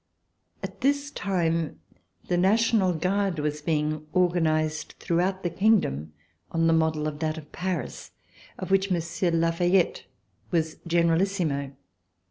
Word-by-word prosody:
At - - -7
this 285 +1 +1
time 165 - -1 0.5
the 180 - +1
National 200 +1 +3
Guard 185 +2 0
was 150 0 -2
being 155 0 -1
organ 175 -2 +3
ized 155 -1 -1
throughout 185 +3 0
the 175 - 0
kingdom 170 - +1 0.4
on 165 0 +1
the 165 - +4
model 160 -1 +1
of 150 -1 -5
that 155 0 -1
of 150 -1 -10
Paris, 180 -7 -4 0.5
of 185 - -6
which 195 0 +3
Monsieur 170 0 0
de 165 - +1
La 165 0 +2
Fayette 175 +2 +1 0.4
was 160 -2 0
Generalissimo. 170 -4 +1
170 Hz, 135 wpm, -26 LUFS, 155-185 Hz, 0.5 s, the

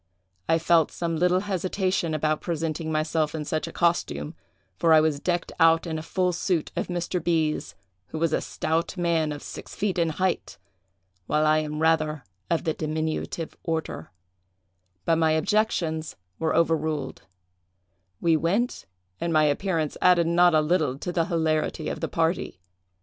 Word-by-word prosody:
I 165 - +5
felt 165 -1 +3
some 170 -1 -2
little 180 +3 +2
hesitation 185 -3 -1
about 155 0 0
presenting 160 -1 -2
myself 155 0 0
in 150 -1 -4
such 155 +1 -2
a - - -6
costume, 120 - 0 0.4
for 165 - +3
I 155 - +8
was 155 -2 +1
decked 175 +2 -1
out 165 0 +5
in 160 -2 -3
a - - -5
full 180 +2 0
suit 175 -2 -1
of - - -2
Mr. 175 -1 -2
B——'s, 160 -3 0 0.3
who - - -6
was 165 0 +1
a - - +1
stout 165 +4 -2
man, 165 -3 +1
of 145 - -6
six - - -9
feet 195 -3 -1
in 165 -1 +2
height, 185 +3 -2 0.7
while 155 0 +2
I 155 0 +4
am 150 0 -3
rather 155 -2 +2 0.3
of 170 - +1
the 160 - 0
diminutive 155 +1 -3
order; 160 - -3 1.0
but 165 - +3
my 160 -1 +3
objections 160 -3 0 0.2
were 160 -1 0
overruled; 160 -2 0 1.0
we 165 -1 +3
went, 195 +10 0 0.3
and 170 - -1
my 155 -1 +4
appearance 155 +1 0
added 180 -2 +5
not 175 0 +4
a 155 - +5
little 155 -4 +1
to 175 - -4
the 170 -2 +1
hilarity 160 -2 0
of - - -4
the - - -2
party. 165 - -1
160 Hz, 160 wpm, -26 LUFS, 155-175 Hz, 1.0 s, I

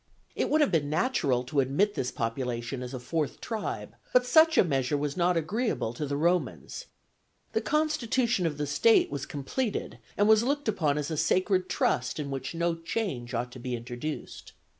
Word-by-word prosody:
It - - 0
would 310 +1 +3
have 295 - +3
been 150 -5 +1
natural 150 - +1
to 140 +3 -1
admit 140 +11 +2
this 125 -10 -2
population 120 +1 -3
as 125 +1 -5
a - - -4
fourth 150 +4 -2
tribe, 220 -2 -4 0.2
but 250 0 +5
such 320 +4 +5
a - - +7
measure 140 -3 0
was 145 0 -2
not 175 0 +2
agreeable 180 - -1
to 145 +4 -4
the 140 +1 -2
Romans: 175 - -1 0.7
the - - +1
constitution 260 - +1
of 150 -3 -4
the 150 - -1
state 145 +10 +4
was 140 -1 -4
completed 200 - -3 0.2
and 205 - +4
was 220 0 +6
looked 285 +3 -1
upon 155 -9 +1
as 150 +2 -2
a 155 - -2
sacred 185 +3 +2
trust 125 +4 0
in 140 -2 -4
which 135 +4 -4
no 170 0 +1
change 165 - -3
ought 120 +1 -2
to 130 - -10
be 125 0 -3
introduced. 120 +5 -6
155 Hz, 185 wpm, -28 LUFS, 135-215 Hz, 0.7 s, a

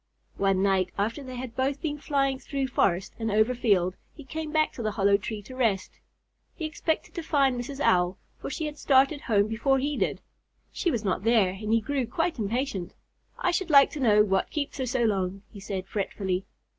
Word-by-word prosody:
One 195 -1 +2
night, 190 -2 +2
after 220 +7 -1
they 255 -1 -7
had 245 -2 -6
both 270 +2 0
been 295 -2 -3
flying 275 -2 0
through 275 -1 -3
forest 190 -5 +1
and 225 -1 -1
over 220 +4 +3
field, 195 -7 +2 0.2
he 295 - -11
came 310 +3 -5
back 310 0 +2
to - - -7
the 215 -2 -1
hollow 200 -1 +3
tree 210 +1 -4
to 255 +5 -10
rest. 220 -7 0 0.6
He 320 - -4
expected 315 +1 -2
to 345 - -4
find 280 -5 +2
Mrs. 265 +3 -5
Owl, 180 -7 +2 0.2
for - - -5
she 315 +3 -3
had 300 -1 -6
started 275 +1 +3
home 205 -4 +2
before 235 +5 +1
he 285 +2 -1
did. - - 0 0.5
She 350 - -1
was 230 -8 -2
not 190 0 0
there 225 -5 +4
and 210 +3 -4
he 230 0 +4
grew 265 +1 -1
quite 330 +3 -1
impatient. 215 -3 -2 0.4
"I 360 - +1
should 355 0 -1
like 280 -2 +7
to 300 - -6
know 210 -5 +5
what 195 -2 0
keeps 295 -1 -4
her 260 - -1
so 245 0 0
long," 195 -3 0
he 205 - -10
said, 195 -2 -4
fretfully. 195 -2 -2
235 Hz, 205 wpm, -27 LUFS, 200-280 Hz, 0.6 s, like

